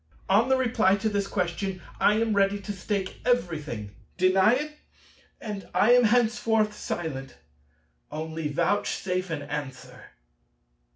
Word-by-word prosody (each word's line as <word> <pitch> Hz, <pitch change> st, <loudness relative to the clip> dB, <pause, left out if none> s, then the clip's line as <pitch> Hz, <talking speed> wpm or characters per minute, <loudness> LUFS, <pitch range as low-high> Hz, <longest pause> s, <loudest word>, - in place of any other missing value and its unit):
On 215 Hz, +6 st, +3 dB
the 265 Hz, -, +4 dB
reply 225 Hz, -6 st, +3 dB
to 205 Hz, +2 st, -1 dB
this 200 Hz, -1 st, -1 dB
question 185 Hz, +1 st, -2 dB, 0.2 s
I 210 Hz, -, +4 dB
am 225 Hz, 0 st, +1 dB
ready 200 Hz, 0 st, +2 dB
to 205 Hz, -, -5 dB
stake 195 Hz, 0 st, -3 dB
everything. 155 Hz, -, -1 dB, 0.3 s
Deny 190 Hz, +4 st, +4 dB
it, 300 Hz, +3 st, -3 dB, 0.7 s
and 205 Hz, -3 st, -6 dB
I 225 Hz, -, +5 dB
am 245 Hz, -1 st, +6 dB
henceforth 225 Hz, -2 st, +2 dB
silent. 145 Hz, -9 st, -5 dB, 0.7 s
Only 160 Hz, +1 st, -4 dB
vouchsafe 185 Hz, +3 st, -1 dB
an 150 Hz, -3 st, -3 dB
answer. 145 Hz, -2 st, -7 dB
195 Hz, 125 wpm, -26 LUFS, 165-220 Hz, 0.7 s, am